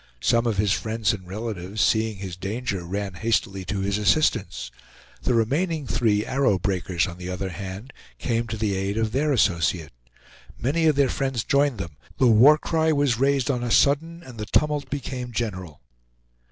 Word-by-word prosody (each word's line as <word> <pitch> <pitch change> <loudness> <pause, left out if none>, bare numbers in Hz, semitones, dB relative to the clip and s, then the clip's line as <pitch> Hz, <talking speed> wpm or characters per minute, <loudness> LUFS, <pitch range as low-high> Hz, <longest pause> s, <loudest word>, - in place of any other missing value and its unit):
Some 115 0 +2
of 110 -4 0
his 100 -1 +2
friends 110 0 0
and 95 -3 -7
relatives, 100 -1 -5
seeing 110 +1 +2
his 95 -2 -6
danger, 100 0 -3
ran 100 +2 -3
hastily 100 -1 -1
to 95 +3 -2
his 100 +1 0
assistance. 105 - +1 0.5
The 125 - +1
remaining 150 +7 0
three 110 -4 +1
Arrow 130 -7 +2
Breakers, 90 -3 -1
on 90 -1 -8
the 90 0 -6
other 95 +1 -3
hand, 95 +7 -7 0.2
came 115 - -1
to 110 - -4
the 105 -2 0
aid 95 +2 -2
of 110 -1 0
their 145 +4 +1
associate. 85 - +1 0.6
Many 160 +7 +1
of 155 - +4
their 140 -1 +4
friends 135 -4 -1
joined 140 -3 +2
them, 85 -6 -7 0.2
the 130 - +3
war 125 +6 +7
cry 160 0 +1
was 140 -6 +1
raised 140 0 +2
on 125 -2 -2
a 120 - -2
sudden, 160 - +2
and 125 -6 -11
the 105 - -4
tumult 150 -3 +1
became 130 -3 -4
general. 95 - -4
110 Hz, 180 wpm, -24 LUFS, 95-135 Hz, 0.6 s, war